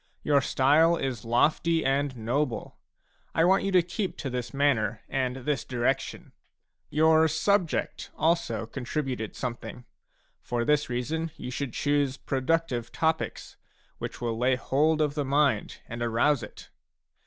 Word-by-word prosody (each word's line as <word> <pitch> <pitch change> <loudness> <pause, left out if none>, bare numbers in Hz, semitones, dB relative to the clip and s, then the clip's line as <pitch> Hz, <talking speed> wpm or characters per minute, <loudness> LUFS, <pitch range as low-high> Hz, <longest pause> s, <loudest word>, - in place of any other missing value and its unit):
Your 145 -2 +3
style 150 +6 +4
is 125 -7 -3
lofty 160 +7 +2
and 135 -1 0
noble; 120 +3 -2 0.6
I 165 - +4
want 190 +2 +4
you 195 - -1
to 180 -2 +5
keep 185 +3 -3
to 135 - -4
this 125 -1 -3
manner 120 -7 +1
and 130 -2 -1
this 135 +2 -2
direction. 125 +1 -2 0.6
Your 160 +1 +4
subject 170 +3 0
also 155 -9 +1
contributed 125 -2 -4
something; 120 0 -6 0.6
for 120 -1 -2
this 150 0 +2
reason 155 +7 -2
you 125 - -6
should 130 -1 -4
choose 145 -2 +1
productive 135 -4 -1
topics, 160 0 -2 0.4
which - - -6
will 115 -2 -2
lay 130 +1 +3
hold 155 +5 +1
of 150 -2 +1
the 145 -1 -1
mind 140 -5 +1
and 120 +1 -6
arouse 120 +4 +2
it. - - -11
140 Hz, 140 wpm, -27 LUFS, 125-155 Hz, 0.6 s, to